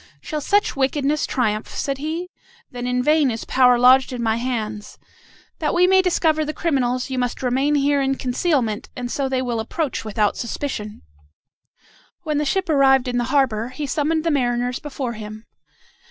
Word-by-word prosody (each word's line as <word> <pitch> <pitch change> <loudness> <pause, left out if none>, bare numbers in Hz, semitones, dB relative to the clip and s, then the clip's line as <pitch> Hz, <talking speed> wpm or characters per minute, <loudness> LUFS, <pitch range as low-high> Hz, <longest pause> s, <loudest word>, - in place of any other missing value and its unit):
"Shall 305 -2 -5
such 410 +7 +1
wickedness 280 +2 0
triumph?" 215 -4 -1
said 275 -1 -3
he. 330 +5 -4 0.4
"Then 245 0 -5
in 250 0 0
vain 300 -1 +3
is 225 -2 -4
power 250 -1 +4
lodged 255 +2 +5
in 245 -2 -4
my 220 0 +1
hands. 220 -4 -4 0.6
That - - -1
we 355 +1 +5
may 380 +1 +5
discover 320 -4 +1
the 305 0 -4
criminals, 255 -5 -1
you 260 - -1
must 245 +1 -2
remain 265 +4 +1
here 285 0 +2
in 270 0 +1
concealment, 250 -4 -1
and 245 -1 -5
so 275 -2 -1
they 260 -1 0
will 240 -2 -2
approach 285 +4 -3
without 215 -1 0
suspicion." 230 -3 -5 1.2
When 305 -2 -1
the 300 - 0
ship 380 +6 0
arrived 270 -4 +4
in 245 0 0
the 240 - 0
harbor, 255 -4 +1
he 290 +3 -5
summoned 310 +3 0
the 335 - +1
mariners 245 -2 0
before 270 -4 -5
him. 215 0 -9
265 Hz, 175 wpm, -21 LUFS, 245-295 Hz, 1.2 s, lodged